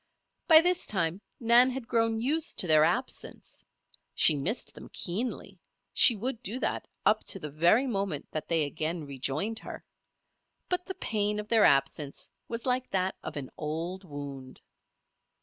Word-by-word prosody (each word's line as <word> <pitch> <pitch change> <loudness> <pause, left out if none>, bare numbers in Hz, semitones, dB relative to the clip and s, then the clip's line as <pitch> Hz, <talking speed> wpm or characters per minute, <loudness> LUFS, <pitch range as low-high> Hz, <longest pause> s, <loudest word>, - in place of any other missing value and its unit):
By 320 -1 +9
this 360 +1 0
time 180 -1 -1 0.2
Nan 240 +1 +5
had 255 -2 -6
grown 225 -1 +1
used 295 +7 +1
to - - +5
their 155 -2 +5
absence. 235 +11 -3 0.5
She 155 - +6
missed 175 - -2
them - - -12
keenly 220 +7 -3 0.3
she 240 - +7
would 235 +3 -4
do 250 +2 -4
that - - -2 0.2
up - - +3
to - - +1
the 150 -4 -7
very 170 - +3
moment 195 - -2
that 155 - -5
they 165 -2 +2
again 155 +2 -3
rejoined 140 - -2
her; - - -10 0.8
but 360 0 -2
the 380 - -5
pain 210 -1 -1
of 210 +1 -7
their 225 -2 +5
absence 140 +1 0 0.2
was 230 0 -5
like 255 0 0
that 190 0 -1
of - - -7
an 135 -3 -6
old 165 +5 -4
wound. 140 -5 -9
195 Hz, 160 wpm, -28 LUFS, 155-240 Hz, 0.8 s, By